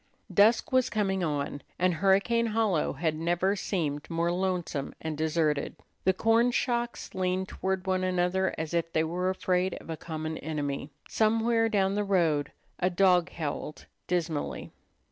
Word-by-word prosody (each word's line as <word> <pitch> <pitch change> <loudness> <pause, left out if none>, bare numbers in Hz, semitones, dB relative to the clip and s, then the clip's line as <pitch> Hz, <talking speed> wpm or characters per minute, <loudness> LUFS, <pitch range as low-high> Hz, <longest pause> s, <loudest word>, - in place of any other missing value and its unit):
Dusk 220 +6 +4
was 255 -1 +3
coming 195 -3 0
on, 145 -2 -2 0.2
and 180 0 +2
Hurricane 200 +7 +2
Hollow 215 -7 +1
had 155 +2 -1
never 175 +5 +1
seemed 155 -7 -2
more 170 0 0
lonesome 180 -6 -2
and 160 -1 -4
deserted. 155 -2 0 0.3
The 190 - +4
corn 225 +5 +3
shocks 240 -1 -1
leaned 185 0 -1
toward 190 0 -2
one 185 -1 0
another 185 +1 +1
as 160 +1 -4
if 165 -1 0
they 160 - +3
were 180 +3 -1
afraid 185 0 0
of - - -9
a 160 - -4
common 160 -1 -5
enemy. 145 -2 -3 0.2
Somewhere 225 +1 +2
down 195 -3 +2
the 205 +1 0
road 165 -7 +1 0.3
a 180 - +2
dog 180 -1 +3
howled 150 -2 -5 0.2
dismally. 165 -4 -2
180 Hz, 150 wpm, -28 LUFS, 160-195 Hz, 0.3 s, Dusk